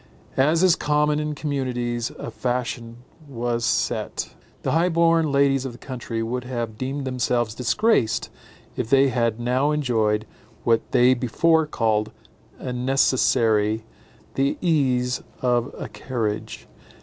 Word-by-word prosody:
As 160 +5 +3
is 185 -3 +6
common 150 0 +1
in 150 0 -2
communities, 125 -5 -2
a - - -6
fashion 120 -1 -3 0.2
was 120 -2 -2
set. - - -1 0.3
The - - 0
high 170 +3 +3
born 165 -2 +3
ladies 140 -1 +3
of 130 -3 -5
the - - -12
country 120 -3 -5
would 125 +2 -3
have 120 -3 -4
deemed 135 +4 -4
themselves 120 -3 0
disgraced 125 - +1 0.4
if 110 - -3
they 135 +1 +5
had 115 -2 0
now 125 +4 +1
enjoyed, 110 -8 +1 0.4
what 115 -1 +3
they 125 +1 +5
before 160 +6 +2
called 110 -6 0 0.5
a 125 - -5
necessary, 115 -4 +2 0.5
the 135 +1 0
ease 130 -7 +1 0.2
of 125 +1 +1
a - - -5
carriage. 110 -5 -4
125 Hz, 130 wpm, -23 LUFS, 115-140 Hz, 0.5 s, is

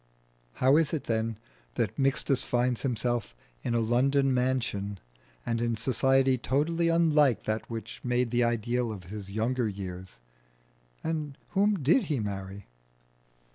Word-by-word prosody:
How 130 - +4
is 160 -2 +2
it 155 - -1
that 115 0 0 0.7
Mixtus 135 -1 +2
finds 125 0 0
himself 120 - -1 0.3
in 120 - -1
a - - +3
London 135 +4 +2
mansion, 120 -6 -1 0.5
and 115 0 -1
in 120 -1 0
society 130 +2 +2
totally 160 +7 +1
unlike 150 -6 +3
that 110 +1 -3
which 115 -1 -7
made 125 -1 0
the 120 0 +2
ideal 120 +1 0
of 100 -4 -7
his 100 -2 -6
younger 115 +4 0
years? 95 - -7 0.9
And 155 -3 -3
whom 200 -4 +1
did 180 - +4
he 150 -6 -1
marry? 100 -1 -5
125 Hz, 135 wpm, -28 LUFS, 110-135 Hz, 0.9 s, How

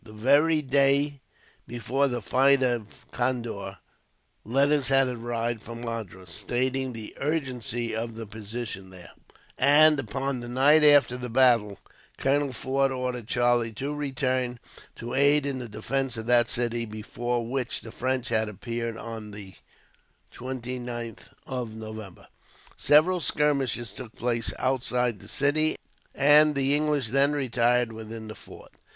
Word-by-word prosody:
The 110 -1 -13
very 145 +8 +3
day 140 +1 +2 0.5
before 125 +4 0
the 120 -4 -3
fight 135 +4 +4
of 120 -4 -3
Condore, 115 -6 -3 0.7
letters 140 +3 +2
had 135 0 +4
arrived 120 -1 -3
from 115 0 -9
Madras, 105 -7 -6
stating 130 +7 -1
the 110 -3 -8
urgency 125 -6 -2
of 115 0 -4
the 115 0 -6
position 105 -2 -6
there; 90 -2 -12 0.5
and, 150 +2 +6
upon 135 -1 -3
the 120 - -7
night 145 +5 +5
after 145 -4 +6
the 125 0 -5
battle, 115 -5 +3 0.4
Colonel 140 +1 +1
Forde 135 +2 0
ordered 125 -3 -3
Charlie 120 -2 +1
to 135 +7 -4
return 130 -3 -1 0.4
to 120 +1 -7
aid 140 +1 +3
in 140 -2 -2
the 120 -2 -6
defence 135 +3 -2
of 110 - -5
that 120 -1 +4
city, 120 -1 -1
before 115 +2 -4
which 125 0 -2
the 115 - -10
French 130 +1 -2
had 110 -2 +1
appeared 115 +2 -5
on 115 -2 -7
the 100 -2 -10 0.8
29th 125 -2 -6 0.2
of 125 -4 -5
November. 110 -3 -9 0.5
Several 160 +5 +4
skirmishes 140 - 0
took 120 -2 -9
place 115 -1 -1
outside 125 -3 0
the - - -14
city, 155 +2 +1 0.4
and 150 +1 +5
the 140 0 +2
English 150 -4 +1
then 140 +4 +3
retired 125 -3 +1
within 110 0 -8
the 110 - -7
fort. - - -14
125 Hz, 140 wpm, -26 LUFS, 115-135 Hz, 0.8 s, and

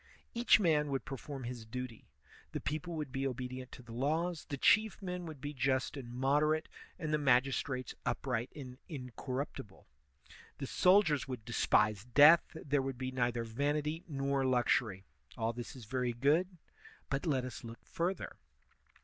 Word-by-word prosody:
Each 235 -2 +5
man 155 -6 +3
would 135 -1 -2
perform 135 0 -6
his 120 -1 -5
duty; 120 0 -7 0.4
the - - -1
people 155 +3 -3
would 150 -4 -4
be 135 +1 -1
obedient 130 0 -5
to 125 - -10
the 120 - -12
laws, 160 +7 -1
the 140 - -3
chief 215 +9 +4
men 180 -2 -4
would 155 -3 -8
be 145 +2 -5
just 130 0 0
and 125 -4 -7
moderate, 150 +5 +2 0.3
and 155 -3 -3
the 150 - +3
magistrates 130 -1 +1
upright 125 -2 -1
and 130 -3 -9
incor 130 -1 -4
ruptible; 110 -10 -12 0.7
the - - -4
soldiers 180 -3 +4
would 125 -5 -6
despise 105 -3 +2
death; 145 +7 +8
there 145 -3 0
would 135 -1 -4
be 130 0 -3
neither 120 -2 0
vanity 145 +7 -1
nor 140 -2 0
luxury. 120 -6 +2 0.3
All 115 0 0
this 120 +2 -7
is 125 -4 -10
very 125 +1 -1
good; 160 +9 +2 0.5
but 140 +5 -1
let 130 -4 +1
us 130 - -7
look 115 0 -10
further. 180 +3 -3
135 Hz, 160 wpm, -34 LUFS, 125-150 Hz, 0.7 s, death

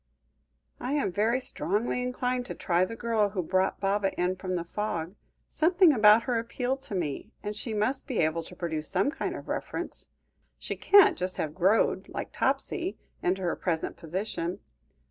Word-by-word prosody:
"I 255 +3 -2
am 290 -10 +1
very 220 +7 +2
strongly 240 -1 -1
inclined 250 0 -1
to - - -5
try 175 0 +2
the 230 - -7
girl 225 -3 +1
who 190 -3 -2
brought 185 +3 +1
Baba 195 0 +1
in 180 +1 +1
from 185 0 -3
the 170 - -1
fog. 175 -2 -3 0.3
Something 345 0 +4
about 215 -1 +6
her 245 -3 0
appealed 250 +3 -2
to 210 - -6
me, 160 +2 -3
and 210 0 -3
she 220 +1 -3
must 240 +7 0
be 255 -6 -3
able 160 +1 +1
to 180 - -10
produce 160 -3 -3
some 195 +9 +2
kind 325 - -3
of - - -9
reference. - - -4 0.5
She - - -4
can't 405 0 +6
just 185 0 -1
have 150 -1 -2
'growed,' 190 +6 +2
like - - -5
Topsy, 370 0 -1 0.2
into 190 +1 0
her 175 - 0
present 165 -3 -2
position. 175 0 -3
205 Hz, 175 wpm, -28 LUFS, 180-245 Hz, 0.5 s, about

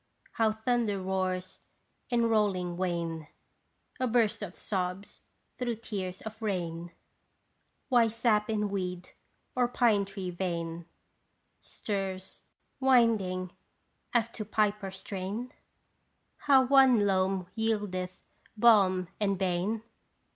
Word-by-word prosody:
How 225 -1 +2
thunder 220 -2 0
roars 185 -1 -2 0.5
in 235 -2 +2
rolling 195 -6 +1
wane 170 -3 -2 0.7
A 255 - +1
burst 230 -3 +2
of 195 -3 -6
sobs 185 0 -3 0.4
through 240 -2 -1
tears 195 -4 -5
of 220 +1 -8
rain? 175 -5 -3 1.0
Why 240 -3 +5
sap 225 -1 +1
in 210 -1 0
weed 180 -2 -4 0.4
or 250 -1 +3
pine 230 -5 +3
tree 195 -2 -5
vein 170 -2 -3 0.7
Stirs, 190 -2 -4 0.4
winding 220 -9 +3 0.6
as 235 -1 +1
to 215 - -5
piper 210 -1 0
strain? 195 +5 -5 1.0
How 265 -2 +7
one 260 -5 +6
loam 190 -1 +1
yieldeth 205 -5 -2 0.3
balm 195 -5 +5
and 200 -2 +1
bane 190 +4 -1
200 Hz, 105 wpm, -30 LUFS, 185-225 Hz, 1.0 s, How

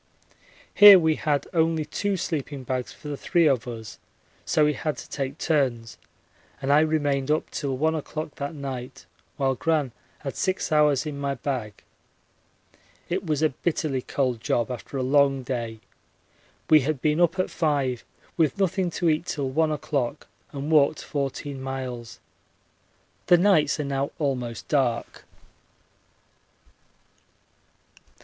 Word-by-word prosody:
Here 205 -1 +10
we 160 -3 +3
had 145 -2 -1
only 160 -2 +1
two 200 +4 -2
sleeping 145 -5 -4
bags 125 0 -3
for - - -12
the 145 - -3
three 170 +4 +2
of 130 -4 +2
us, 115 -3 -8 0.5
so 155 - +3
we 150 - +2
had 150 +2 -3
to - - -9
take 140 0 -4
turns, 130 -9 -1 0.6
and 135 +1 +1
I 145 - +6
remained 145 -3 +1
up 155 +1 0
till 135 -2 -3
1 160 +3 +1
o'clock 155 0 -5
that 140 +3 -4
night 135 -2 -7 0.3
while 135 -1 +1
Gran 150 0 0 0.3
had 135 -2 -5
six 185 -2 -1
hours 150 -2 +3
in 145 -2 -5
my 140 -1 -1
bag. 120 -6 -4 1.3
It 185 +1 -2
was 155 -1 0
a 155 - +4
bitterly 150 -2 -2
cold 125 -3 -1
job 120 +2 0
after 125 +3 -6
a 130 - -1
long 135 0 +3
day. 115 -3 -4 0.9
We 155 - +7
had 145 0 -1
been 150 +4 +1
up 175 +1 +3
at 185 - -1
5 140 -7 0 0.3
with 155 -5 +2
nothing 190 -1 +1
to 170 0 -1
eat 160 +2 +1
till 140 -3 -2
1 155 +3 +2
o'clock, 145 -5 -2 0.3
and 145 +2 -4
walked 150 -1 +3
14 140 -1 -4
miles. 130 -3 -6 1.1
The 175 - +7
nights 170 -6 +3
are - - 0
now 140 0 -1
almost 125 -6 -3
dark. 125 -5 -1
145 Hz, 145 wpm, -25 LUFS, 130-155 Hz, 1.3 s, Here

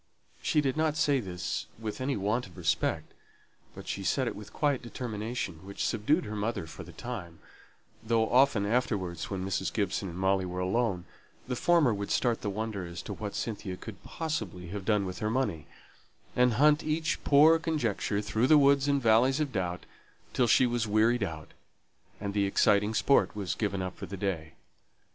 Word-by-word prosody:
She 150 - +2
did 135 0 -1
not 155 -1 +1
say 145 -3 +3
this 90 -5 -4
with 110 +2 -5
any 135 +1 0
want 105 +4 -1
of 90 - -17
respect; 80 -1 -1 0.6
but - - -10
she - - -3
said - - +1
it - - -3
with - - -10
quiet 145 -3 0
determination, 110 -7 -5
which 100 +1 -4
subdued 145 - +1
her 105 - -5
mother 105 -4 -2
for 80 0 -10
the 85 - -12
time; 90 -4 -7 0.7
though 110 0 +2
often 125 -5 +4
afterwards, 100 -7 -1
when 95 -2 -3
Mrs. 95 0 -1
Gibson 100 -2 -1
and 85 - -8
Molly 95 0 +2
were 90 0 -4
alone, 95 -1 0 0.4
the 125 - -2
former 160 -3 +3
would 100 0 -4
start 120 -3 +1
the 105 - -2
wonder 105 -1 -3
as 85 -1 -7
to - - -5
what 105 -2 -6
Cynthia 100 -4 -4
could 100 -2 -10
possibly 100 - -4
have 100 0 -6
done 105 -2 +2
with 90 -2 -5
her 105 - -1
money, 110 -10 -1 0.7
and 125 -1 +4
hunt 150 +5 +4
each 155 +1 -1
poor 155 +3 +6
conjecture 120 - -1
through 125 +9 +4
woods 140 -1 +4
and 140 -1 +3
valleys 120 +5 +4
of 150 -3 -1
doubt, 90 -3 -2 0.5
till 125 - +2
she 130 - +5
was 120 -2 0
wearied 110 +3 +3
out; 80 -6 -4 0.7
and 100 -1 -4
the 100 -1 +2
exciting 105 +2 +3
sport 140 0 +3
was 100 -4 -2
given 100 -3 -2
up 90 0 -5
for - - -7
the 100 - -6
day. 85 -5 -3
110 Hz, 185 wpm, -29 LUFS, 95-125 Hz, 0.7 s, poor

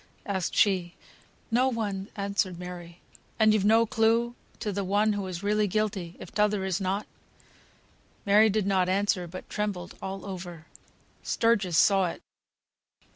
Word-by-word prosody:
asked 190 -3 -2
she. 185 -4 +2 0.6
"No 250 +3 +3
one!" 205 -5 -3
answered 200 -3 -1
Mary. 175 -1 -9 0.4
"And 220 -1 +5
you've 215 -3 +2
no 225 +3 +5
clue 225 +2 +2 0.3
to 210 - -2
the 200 0 -2
one 205 +3 +2
as 205 - -2 0.2
is 170 - -7
really 210 +1 +2
guilty, 195 -4 -2
if - - -10
t'other 210 -1 +1
is 190 +1 -1
not?" 195 +2 -1 1.2
Mary 210 +2 +6
did 210 -1 0
not 190 -2 +2
answer, 190 -2 +1
but 185 +2 -9
trembled 200 -4 -3
all 195 0 -5
over. 175 -4 -7 0.6
Sturgis 205 -7 +1
saw 195 -2 +4
it. 170 - -7
200 Hz, 145 wpm, -27 LUFS, 185-215 Hz, 1.2 s, Mary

